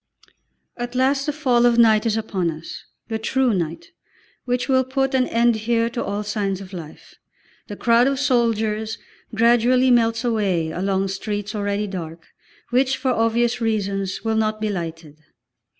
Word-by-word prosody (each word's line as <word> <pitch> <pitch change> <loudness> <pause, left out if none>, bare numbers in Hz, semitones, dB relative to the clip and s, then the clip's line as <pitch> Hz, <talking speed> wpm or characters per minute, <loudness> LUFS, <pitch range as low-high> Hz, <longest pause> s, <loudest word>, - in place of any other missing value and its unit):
At 240 0 -5
last 270 +2 +1
the - - +2
fall 260 -5 +1
of 235 -1 +2
night 225 -1 +5
is 220 0 +1
upon 195 -5 -1
us, 160 0 -8 0.2
the 225 -1 -3
true 255 +2 +1
night, 170 -3 -4 0.5
which 250 0 -1
will 260 -1 +3
put 270 +1 -1
an 255 -1 +2
end 235 0 +2
here 230 +1 0
to 235 - -3
all 205 +1 -3
signs 205 -2 -2
of 195 0 -11
life. 160 -4 -10 0.5
The 205 - -7
crowd 235 +3 +3
of 275 0 0
soldiers 225 -5 0 0.4
gradually 240 +3 +4
melts 230 -1 +2
away 195 -9 0
along 190 +2 -1
streets 205 +2 -4
already 205 0 -1
dark, 165 -4 -7 0.5
which, 260 +2 +2
for 260 - 0
obvious 235 +1 +1
reasons, 200 -4 -2
will 225 -1 0
not 215 0 0
be 215 0 -1
lighted. 165 -5 -6
220 Hz, 160 wpm, -22 LUFS, 195-240 Hz, 0.5 s, night